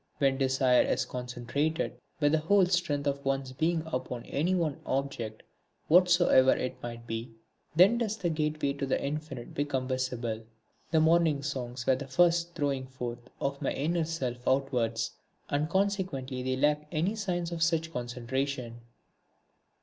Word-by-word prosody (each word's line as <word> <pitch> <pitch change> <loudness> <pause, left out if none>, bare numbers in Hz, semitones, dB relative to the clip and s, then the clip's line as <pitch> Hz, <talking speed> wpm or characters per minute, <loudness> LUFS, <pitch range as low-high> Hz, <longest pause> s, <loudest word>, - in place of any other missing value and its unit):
When 135 -1 +2
desire 130 -1 +4
is - - +1
concentrated, 125 +6 -2 0.3
with 145 -1 +3
the 160 - +3
whole 190 +5 +4
strength 170 -6 0
of 140 0 -1
one's 135 -1 -1
being 160 +4 0
upon 125 -5 -4
any 175 +6 0
one 160 -5 -1
object 130 -5 -3 0.5
whatsoever 175 -6 +6
it 125 - -4
might 115 -1 -7
be, 115 0 -5 0.4
then 195 +8 +6
does 220 -2 -1
the 175 -5 -1
gateway 155 -2 0
to 140 -1 -3
the - - +1
Infinite 150 -3 -5
become 135 -3 -1
visible. 125 -4 -2 0.5
The 160 - +3
morning 160 -3 +3
songs 125 -3 -4
were 130 - +4
the 140 0 -6
first 170 +3 +3
throwing 135 -3 -1
forth 125 -2 -6
of 140 +1 -2
my 140 - 0
inner 165 +3 0
self 135 -7 -3
outwards, 125 -4 +1 0.4
and 145 +2 +1
consequently 185 -10 -1
they 130 0 -1
lack 150 +2 +1
any 175 +6 0
signs 175 -5 -2
of 170 -1 -4
such 165 -1 +1
concentration. 125 0 -3
140 Hz, 150 wpm, -30 LUFS, 130-165 Hz, 0.5 s, whatsoever